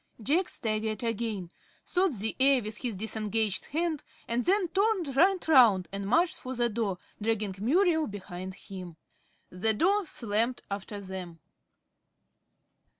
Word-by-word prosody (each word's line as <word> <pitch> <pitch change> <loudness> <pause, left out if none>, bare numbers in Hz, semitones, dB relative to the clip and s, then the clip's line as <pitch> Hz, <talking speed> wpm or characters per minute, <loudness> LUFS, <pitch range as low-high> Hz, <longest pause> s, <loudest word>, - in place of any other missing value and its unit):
Jack 310 - +1
staggered 215 0 -2
again, 220 -6 -2 0.3
sawed 365 -5 +1
the 220 +2 -3
air 265 -2 +5
with 215 0 -4
his 240 -5 -3
disengaged 215 0 -1
hand, 320 0 -1 0.3
and 235 +1 0
then 385 0 +3
turned 385 -7 +1
right 370 +5 +4
round 230 - +6
and 200 0 -4
marched 335 - +3
for 260 0 -6
the 240 0 +1
door, 210 -4 -1 0.2
dragging 215 -2 0
Muriel 320 - +3
behind 190 -2 -7
him. 185 -4 -9 0.5
The 215 +5 +2
door 390 - +2
slammed 230 0 -1
after 200 +1 -4
them. 185 -4 -7
225 Hz, 135 wpm, -29 LUFS, 200-305 Hz, 0.5 s, round